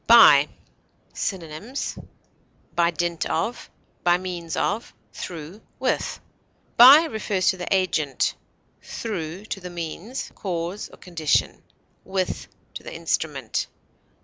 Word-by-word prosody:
BY. -, -, +9 dB, 0.7 s
Synonyms: 190 Hz, -, -4 dB, 0.8 s
by 170 Hz, -1 st, +3 dB
dint 170 Hz, 0 st, -1 dB
of, 225 Hz, +9 st, -2 dB, 0.3 s
by 175 Hz, 0 st, +4 dB
means 175 Hz, -3 st, -5 dB
of, 220 Hz, +3 st, -1 dB, 0.2 s
through, 170 Hz, -, -7 dB, 0.2 s
with. -, -, -1 dB, 0.6 s
By 270 Hz, +7 st, +10 dB
refers 210 Hz, -, 0 dB
to 190 Hz, -, +1 dB
the 180 Hz, -, -5 dB
agent; 160 Hz, -8 st, +1 dB, 0.5 s
through, 185 Hz, -3 st, -5 dB
to 210 Hz, -, -4 dB
the 180 Hz, -1 st, -7 dB
means, 175 Hz, +8 st, -5 dB
cause, 180 Hz, +1 st, -4 dB
or -, -, -15 dB
condition; 165 Hz, -4 st, 0 dB, 0.4 s
with, 190 Hz, 0 st, -2 dB, 0.3 s
to -, -, -7 dB
the -, -, -9 dB
instrument. -, -, -2 dB
180 Hz, 110 wpm, -24 LUFS, 170-205 Hz, 0.8 s, By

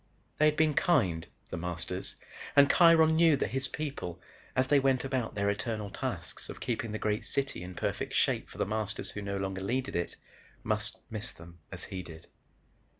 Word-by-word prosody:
They 155 Hz, -, +6 dB
had 150 Hz, 0 st, +4 dB
been 155 Hz, -1 st, +4 dB
kind, 115 Hz, -, +2 dB, 0.2 s
The -, -, -3 dB
Masters, 90 Hz, +2 st, -3 dB, 0.4 s
and 140 Hz, -1 st, +7 dB
Kiron 165 Hz, -2 st, +6 dB
knew 165 Hz, -3 st, +6 dB
that -, -, -1 dB
his 135 Hz, +1 st, +3 dB
people, 135 Hz, -, -4 dB, 0.4 s
as 130 Hz, -, +3 dB
they 145 Hz, +1 st, +5 dB
went 135 Hz, -1 st, +2 dB
about 130 Hz, -4 st, -1 dB
their 100 Hz, -1 st, +1 dB
eternal 105 Hz, 0 st, -2 dB
tasks -, -, -4 dB
of -, -, -7 dB
keeping 115 Hz, -2 st, -2 dB
the 110 Hz, -, -2 dB
great 105 Hz, -1 st, 0 dB
city 140 Hz, -9 st, -1 dB
in 90 Hz, 0 st, -7 dB
perfect -, -, -2 dB
shape -, -, +2 dB
for -, -, -12 dB
The -, -, +1 dB
Masters 105 Hz, 0 st, -2 dB
who 105 Hz, -, -5 dB
no 100 Hz, -1 st, -2 dB
longer 95 Hz, -1 st, -3 dB
needed 125 Hz, +7 st, -1 dB
it, 85 Hz, 0 st, -1 dB, 0.5 s
must -, -, -1 dB
miss 110 Hz, +1 st, -5 dB
them 85 Hz, +1 st, -14 dB
as -, -, -5 dB
he 95 Hz, -, -5 dB
did. 80 Hz, -1 st, -11 dB
110 Hz, 190 wpm, -31 LUFS, 95-140 Hz, 0.5 s, and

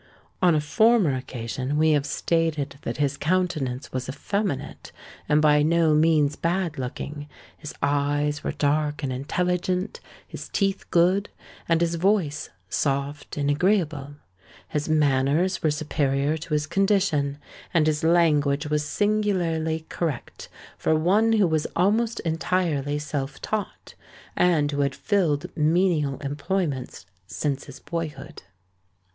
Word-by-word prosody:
On 175 Hz, -3 st, +5 dB
a -, -, +3 dB
former 200 Hz, -, +3 dB
occasion 130 Hz, +2 st, -4 dB
we 155 Hz, +1 st, +4 dB
have 145 Hz, -1 st, +1 dB
stated 155 Hz, -4 st, -1 dB
that -, -, -4 dB
his 140 Hz, -1 st, 0 dB
countenance 155 Hz, -7 st, -1 dB
was 130 Hz, 0 st, -3 dB
effeminate 195 Hz, +1 st, -3 dB, 0.4 s
and 150 Hz, +1 st, +4 dB
by 150 Hz, -1 st, +5 dB
no 160 Hz, 0 st, +3 dB
means 150 Hz, -2 st, +3 dB
bad 170 Hz, -3 st, -1 dB
looking; 145 Hz, +3 st, -5 dB, 0.3 s
his 150 Hz, -, -9 dB
eyes 145 Hz, +1 st, 0 dB
were -, -, -1 dB
dark 150 Hz, 0 st, 0 dB
and 130 Hz, -2 st, -1 dB
intelligent; 180 Hz, +7 st, -1 dB, 0.3 s
his -, -, -8 dB
teeth 195 Hz, -1 st, -1 dB
good; 185 Hz, +4 st, +3 dB, 0.4 s
and 165 Hz, 0 st, +3 dB
his 170 Hz, 0 st, +1 dB
voice 180 Hz, -7 st, +1 dB, 0.2 s
soft 140 Hz, +7 st, -2 dB
and 145 Hz, 0 st, +1 dB
agreeable. 150 Hz, -4 st, 0 dB, 0.5 s
His 150 Hz, 0 st, -2 dB
manners 150 Hz, +4 st, +2 dB
were 155 Hz, -, +2 dB
superior 145 Hz, -1 st, 0 dB
to 160 Hz, 0 st, -6 dB
his 150 Hz, 0 st, 0 dB
condition; 180 Hz, -6 st, +1 dB, 0.3 s
and 165 Hz, -3 st, +3 dB
his 155 Hz, -1 st, 0 dB
language 150 Hz, -4 st, +3 dB
was 150 Hz, 0 st, +1 dB
singularly 170 Hz, -5 st, 0 dB
correct 160 Hz, -8 st, -4 dB, 0.3 s
for 160 Hz, -, +2 dB
one 200 Hz, +8 st, +3 dB
who 210 Hz, -3 st, +4 dB
was 160 Hz, -3 st, 0 dB
almost 220 Hz, +6 st, +2 dB
entirely 160 Hz, -3 st, 0 dB
self 145 Hz, -2 st, -4 dB
taught, 215 Hz, -2 st, -4 dB, 0.4 s
and 155 Hz, -5 st, +3 dB
who 145 Hz, 0 st, -1 dB
had 140 Hz, -2 st, 0 dB
filled 170 Hz, -9 st, 0 dB
menial 155 Hz, -3 st, +2 dB
employments 145 Hz, -, -3 dB, 0.2 s
since 140 Hz, -, -2 dB
his 140 Hz, -, -11 dB
boyhood. 155 Hz, -3 st, -6 dB
155 Hz, 130 wpm, -25 LUFS, 145-175 Hz, 0.5 s, On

